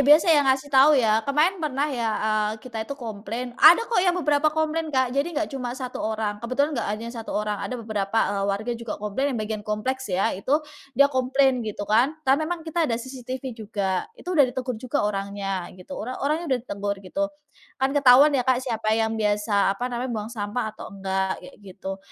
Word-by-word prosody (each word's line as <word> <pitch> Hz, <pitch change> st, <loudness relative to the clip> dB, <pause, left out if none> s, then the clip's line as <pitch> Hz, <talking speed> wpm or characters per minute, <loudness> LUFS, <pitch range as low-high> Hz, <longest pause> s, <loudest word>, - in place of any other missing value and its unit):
biasa 300 Hz, +4 st, +6 dB
ya 300 Hz, -, +6 dB
ngasih 265 Hz, +2 st, +1 dB
tahu. 280 Hz, +3 st, +7 dB
Ya 220 Hz, -3 st, +3 dB
kemarin 320 Hz, +7 st, +2 dB
pernah 285 Hz, -3 st, 0 dB
ya, 235 Hz, -3 st, -1 dB, 0.2 s
eee, 215 Hz, -1 st, +1 dB
kita 225 Hz, 0 st, -7 dB
itu 280 Hz, -, -5 dB
komplain. 230 Hz, 0 st, -5 dB
Ada 350 Hz, +8 st, +8 dB
kok 465 Hz, -4 st, +1 dB
yang 360 Hz, -1 st, +2 dB
beberapa 300 Hz, -3 st, +2 dB
komplain, 315 Hz, +1 st, -1 dB
Kak. 260 Hz, -4 st, +1 dB
Jadi 280 Hz, +5 st, 0 dB
enggak 310 Hz, 0 st, -1 dB
cuma 250 Hz, -2 st, -4 dB
1 255 Hz, -2 st, -5 dB
orang, 215 Hz, -1 st, -2 dB
kebetulan 275 Hz, +6 st, 0 dB
enggak 230 Hz, -7 st, -2 dB
hanya 215 Hz, +3 st, -3 dB
1 230 Hz, -2 st, -5 dB
orang, 210 Hz, -1 st, -2 dB
ada 255 Hz, -, -4 dB
beberapa, 215 Hz, -3 st, -3 dB, 0.2 s
eee, 200 Hz, -1 st, -1 dB
warga 215 Hz, +4 st, -1 dB
juga 235 Hz, -2 st, -5 dB
komplain 245 Hz, +6 st, -2 dB
yang -, -, -2 dB
bagian 215 Hz, -1 st, -4 dB
kompleks 255 Hz, +5 st, -2 dB
ya. 185 Hz, +1 st, +1 dB
Itu 280 Hz, +11 st, 0 dB, 0.3 s
dia 280 Hz, +2 st, +6 dB
komplain 260 Hz, 0 st, +2 dB
gitu 205 Hz, -1 st, -4 dB
kan. 240 Hz, +9 st, +2 dB
Kita 265 Hz, -, +4 dB
memang 325 Hz, +1 st, -3 dB
ada 315 Hz, -9 st, +1 dB
CCTV 255 Hz, +1 st, -6 dB
juga, 205 Hz, -4 st, -2 dB
itu 365 Hz, -6 st, -5 dB
udah 290 Hz, -6 st, +5 dB
ditegur 250 Hz, -2 st, -4 dB
juga 255 Hz, 0 st, -1 dB
orangnya 195 Hz, -2 st, -3 dB
gitu. 185 Hz, +9 st, -12 dB
Ora 255 Hz, +4 st, -5 dB
orangnya 315 Hz, +4 st, 0 dB
udah 260 Hz, -2 st, +1 dB
ditegur 200 Hz, -3 st, -3 dB
gitu, 295 Hz, +11 st, -1 dB, 0.5 s
kan 265 Hz, +1 st, 0 dB
ketahuan 280 Hz, +1 st, +7 dB
ya, 270 Hz, -, +3 dB
Kak, 255 Hz, 0 st, +3 dB
siapa 225 Hz, -4 st, -1 dB
yang 225 Hz, 0 st, +1 dB
biasa 205 Hz, -1 st, +2 dB
apa 245 Hz, -, -4 dB
namanya, 245 Hz, +2 st, -2 dB
buang 215 Hz, +1 st, -4 dB
sampah 210 Hz, +1 st, -3 dB
atau -, -, -9 dB
enggak, 190 Hz, -1 st, -1 dB
kayak -, -, -12 dB
gitu. 195 Hz, -1 st, -7 dB
245 Hz, 200 wpm, -24 LUFS, 210-280 Hz, 0.5 s, Ada